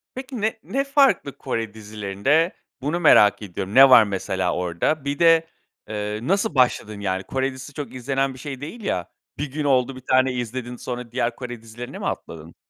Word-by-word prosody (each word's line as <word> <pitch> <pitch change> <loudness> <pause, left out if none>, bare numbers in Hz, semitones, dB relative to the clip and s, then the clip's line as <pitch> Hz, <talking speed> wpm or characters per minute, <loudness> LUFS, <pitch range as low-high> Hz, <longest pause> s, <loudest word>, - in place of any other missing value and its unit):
Peki 260 -3 -6
ne 220 +1 -1
ne 275 +1 -1
farklı 275 - +2
Kore 115 -2 -3
dizilerinde 110 - 0 0.3
bunu 150 +6 -1
merak 105 - +6
ediyorum. 100 0 -5
Ne 135 0 +9
var 125 -3 +9
mesela 95 -3 -2
orada? 90 - -1
Bir 140 +2 -2
de, 165 -1 +5 0.4
eee, 105 0 -3
nasıl 195 +2 0
başladın? 115 -5 +1
Yani, 95 -2 -2
Kore 135 +4 -1
dizisi 130 +2 -10
çok 145 -1 -6
izlenen 135 +2 -1
bir 130 - -13
şey 135 -1 -7
değil 190 +11 -8
ya. 90 - -2 0.3
Bir 145 -1 -4
gün 150 +2 -3
oldu 135 -2 +2
1 130 - -10
tane 130 0 +4
izledin. 125 0 -4
Sonra 125 -1 -6
diğer 120 -1 -1
Kore 120 -3 -7
dizilerine 115 +2 -9
mi - - -5
atladın? 80 0 -6
130 Hz, 185 wpm, -23 LUFS, 105-145 Hz, 0.4 s, Ne